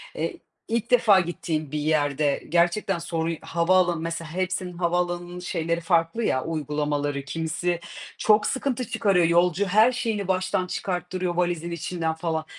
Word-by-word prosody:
eee, - - -3 0.3
ilk 230 +1 -2
defa 225 -5 +6
gittiğin 160 -4 -3
bir 150 - -2
yerde 145 -1 +1
gerçekten 175 +2 +2
sorun 165 -1 -2
havaalanı 175 0 +2
mesela 165 -1 -4
hepsinin 185 0 -2
havaalanının 175 0 -1
şeyleri 170 -1 -2
farklı 165 +6 +1
ya, 130 -10 +1
uygulamaları. 145 -2 -2
Kimisi 165 +3 -2 0.4
çok 210 0 +4
sıkıntı 260 -2 -1
çıkarıyor. 185 -5 +3
Yolcu 175 +3 +3
her 215 +6 +5
şeyini 225 -6 -2
baştan 185 0 0
çıkarttırıyor, 180 -1 -3
valizin 175 -1 -1
içinden 170 0 -2
falan. 160 -1 -2
175 Hz, 135 wpm, -25 LUFS, 160-185 Hz, 0.4 s, defa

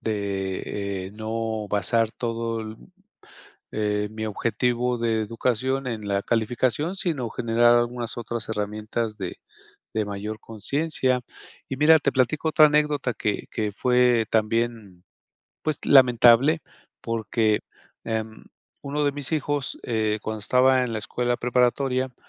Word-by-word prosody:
De, 100 -2 -3
eh, - - -9
no 110 0 -3
basar 110 +3 +1
todo 115 -1 -3
l 110 0 -7 1.0
eh, 105 -1 -1
mi 110 0 -5
objetivo 120 +3 0
de 115 -1 0
educación, 125 +4 -1
en 110 -4 -4
la 100 0 0
calificación, 125 - 0
sino 155 -10 -2
generar 120 +1 +3
algunas 120 0 -1
otras 120 -1 -5
herramientas, 110 +1 -3
de 95 -2 -5 0.6
de 110 -1 0
mayor 105 +2 -5
consciencia. 130 +4 -1 0.5
Y 135 - -4
mira, 155 +3 +7
te - - +1
platico 140 +5 +1
otra 155 0 +7
anécdota, 150 -4 +1
que 105 -1 -2
que 105 -3 -2
fue 125 +1 +3
también, 110 -4 -1 0.6
pues, 155 -3 -1
lamentable. 130 +3 +6 0.4
Porque, 110 -1 0 0.4
em, 110 -1 -4 0.4
uno 145 +1 -2
de 145 - +2
mis 145 +1 -5
hijos, 145 -2 -1
eh, 110 -2 0
cuando 110 0 -4
estaba 130 +4 +3
en 120 -2 -3
la 110 - -2
escuela 120 +3 -1
preparatoria, 125 +1 +1
115 Hz, 130 wpm, -24 LUFS, 110-130 Hz, 1.0 s, mira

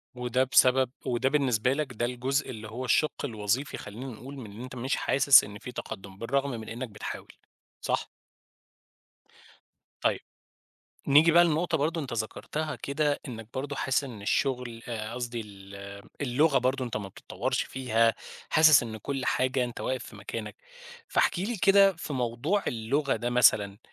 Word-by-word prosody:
وده 125 +1 +1
بسبب 130 -1 +4
وده 125 +1 +1
بالنسبة 130 -4 +2
لك 140 -3 -3
ده 120 +1 -1
الجزء 130 +4 -1
اللي 110 -3 -7
هو 125 +4 -5
الشِّق 145 +4 +1
الوظيفي، 115 +2 -2
خلّينا 110 +6 -8
نقول 130 +2 -8
من 115 -6 -8
إن 105 +3 -10
أنت 130 0 -8
مش 130 +2 -1
حاسس 140 0 +6
إن 105 0 -9
في 125 - -8
تقدُّم 100 -5 -8
بالرغم 140 +6 -1
من 115 -3 -6
إنك 120 +2 -5
بتحاول، 105 0 -7 0.5
صح؟ - - -1 1.9
طيب، - - +1 0.9
نيجي 150 +4 +6
بقى 175 +1 +7
لنقطة 165 0 +1
برضه 160 +3 0
أنت 140 -5 -6
ذكَرتها 150 +7 -3
كده، 145 +1 -1
إنك 115 -3 -8
برضه 140 +2 -4
حاسس 135 +2 +1
إن 115 -7 -8
الشغل، 125 0 -1
آآ 110 -1 -4
قصدي 120 -1 -4
ال 100 -2 -11 0.5
اللغة 140 +2 +3
برضه 130 +1 0
أنت 120 - -4
ما 100 -2 -4
بتتطوّرش - - -3
فيها، 115 -3 +1 0.4
حاسس 155 -3 +7
إن 110 -2 -5
كلّ 135 +4 -4
حاجة 130 0 +1
أنت 120 -1 -7
واقف 130 0 -2
في - - -11
مكانك، - - -6 0.5
فاحكِ - - +2
لي 215 +6 -2
كده 195 +1 +6
في 160 - -6
موضوع 130 - 0
اللغة 130 +5 0
ده، 120 +2 -2
مثلًا 105 -4 +4
125 Hz, 160 wpm, -28 LUFS, 115-140 Hz, 1.9 s, بقى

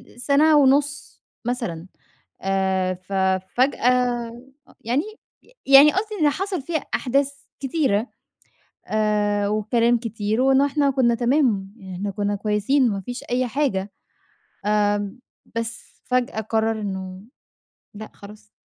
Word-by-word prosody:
السنة 290 +5 +3
ونص 285 +1 +2 0.2
مثلًا. 190 -9 -3 0.5
آآ 190 -1 0
ف 185 +2 -11 0.4
فجأة 250 -2 +1 0.5
يعني، 250 +8 0 0.6
يعني 275 +2 +8
قصدي 425 +2 -2
إن 295 - +5
حصل 375 0 -3
فيها 320 +3 -2 0.2
أحداث 275 +2 +1 0.3
كتيرة، 265 -6 0 0.8
آآ 210 -1 +1
وكلام 230 +3 +2
كتير، 220 0 -2
وإن 270 +1 +4
إحنا 285 0 +2
كنّا 250 -3 +2
تمام، 235 -6 +1 0.2
إحنا 200 +2 -3
كنّا 205 +1 -2
كويسين 215 +6 +1
ما 195 -1 -3
فيش 245 +6 -7
أي 250 +1 -1
حاجة. 215 -7 -1 0.8
آآ 205 -1 +1 0.4
بس 230 +1 -6
فجأة 250 -3 -1
قرر 220 0 -1
إنّه 190 -2 -5 0.7
لأ 215 +1 -9
خلاص، 210 +1 -14
230 Hz, 115 wpm, -22 LUFS, 205-270 Hz, 0.8 s, يعني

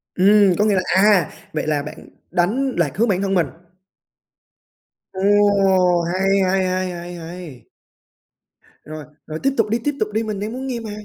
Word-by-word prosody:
Ừm, 200 0 +4
có 210 - +2
nghĩa 210 -2 +2
là 185 - +2
à, 195 -4 +4 0.2
vậy 155 - -3
là 150 -2 0
bạn 150 - -10 0.2
đánh 245 +10 0
lạc 165 -5 +1
hướng 230 +3 +2
bản 195 -3 0
thân 195 -1 -1
mình. 175 -5 +2 1.7
Ồ, 190 0 -2 0.8
hay, 185 +3 -1
hay, 190 0 +1
hay, 185 0 -2
hay, 175 0 -8
hay! 170 -5 -10 1.2
Rồi, 155 -1 -9 0.2
rồi 155 0 -5
tiếp 275 - +2
tục 220 -2 +1
đi! 230 +2 0
Tiếp 290 +1 -1
tục 215 - -1
đi! 220 +1 0
Mình 215 -3 -4
đang 210 +3 -4
muốn 260 +2 -5
nghe 250 -3 -3
mà! 225 -2 -7
190 Hz, 180 wpm, -20 LUFS, 175-215 Hz, 1.7 s, Ừm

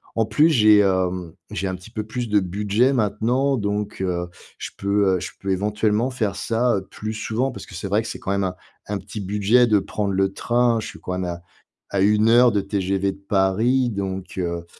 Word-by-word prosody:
En 115 - +2
plus, 130 +10 +3
j'ai, 110 -8 +6
hem, 90 -3 0 0.2
j'ai 95 +3 -2
un 95 - -2
petit 95 +5 -13
peu 110 -2 -4
plus 120 +3 -4
de 105 0 +4
budget 105 +7 +1
maintenant, 120 +4 +1
donc 105 -2 -3
heu, 90 -2 -1 0.3
je - - -6
peux, 100 -1 +2
heu, - - -4
je 90 - -5
peux 100 - -3
éventuellement 105 +4 +1
faire 110 -6 -2
ça, 115 0 +1
heu, 95 -1 -6
plus 110 +1 -5
souvent 110 +4 -2
parce - - -10
que - - -11
c'est 95 +3 -4
vrai 105 +3 +2
que 115 - -7
c'est - - -5
quand 95 - -3
même 100 0 0
un 90 -1 -3 0.3
un 105 - -2
petit 105 +2 -7
budget 105 +5 +3
de 105 -2 +4
prendre 100 +1 -3
le 95 0 +1
train. 120 +1 +1
Je - - -5
suis - - -10
quand - - -6
même 90 0 -2
à 85 -1 -5 0.5
à 100 - +1
1 105 +2 +4
heure 120 +1 +6
de 105 -1 +1
TGV 95 0 -1
de 95 - -18
Paris, 110 +6 +2
donc 95 -2 -5
heu, 85 -1 -3
105 Hz, 225 wpm, -22 LUFS, 95-115 Hz, 0.5 s, j'ai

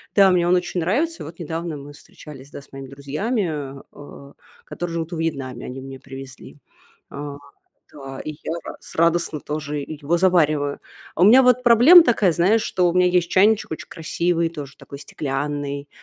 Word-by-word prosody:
да, 195 -2 +6
мне 175 -1 +2
он 180 - +4
очень 180 0 -1
нравится. 290 - -1
И - - -8
вот 160 +2 -11
недавно 165 -1 -4
мы 145 +1 -11
встречались, 145 -1 -14
да, - - -9
с 140 - -21
моими 135 0 -8
друзьями, 155 - -2
а, 140 -3 -6
э, 140 -1 -13 0.3
которые 175 -1 -5
живут 165 0 -4
во 170 - -4
Вьетнаме. 135 -7 -4
Они 130 +1 -7
мне 135 0 -9
привезли. 135 -1 -11 0.5
А, 145 0 -7 0.6
да, 135 -2 -9
и 155 - -5
я - - -4
рад - - -8
с - - -12
радостно 165 -1 +1
тоже 150 0 -4
и 155 +2 -7
его 165 +5 +1
завариваю. 155 -6 +2 0.4
У 175 - +2
меня 235 +7 +8
вот 250 0 +3
проблема 250 +9 +8
такая, 215 - +2
знаешь, 195 +7 +3
что 180 -4 +1
у - - -2
меня 180 0 +4
есть 180 -1 +1
чайничек 205 +2 +3
очень 160 - -7
красивый, 170 +1 -1
тоже 145 -4 -9
такой 140 - -11
стеклянный, 145 0 -4
160 Hz, 185 wpm, -22 LUFS, 140-180 Hz, 0.6 s, меня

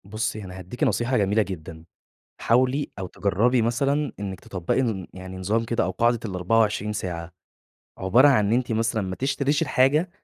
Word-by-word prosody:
بُصي 110 +1 -3
أنا 90 -1 -9
هاديكِ 95 +7 -5
نصيحة 125 +2 +1
جميلة 105 +2 +2
جدًا، 80 -5 -6 0.6
حاولي 130 +4 +2
أو 95 - -4
تجربي 105 +7 +1
مثلًا 140 +5 0
إنِك 95 -2 -5
تطبَّقي 90 +7 -1
ن 105 -7 -2
يعني 95 0 -8
نظام 105 +5 0
كده 115 0 0
أو 90 - -1
قاعدة 120 +6 +2
ال24 105 +2 +1
ساعة، 85 -4 -5 0.7
عبارة 115 +10 +5
عن 110 -7 +4
إن 105 - 0
أنتِ 120 -1 +1
مثلًا 110 -1 0
ما 95 -1 -4
تشتريش 140 +2 0
الحاجة 145 +4 +2
110 Hz, 165 wpm, -24 LUFS, 95-125 Hz, 0.7 s, عبارة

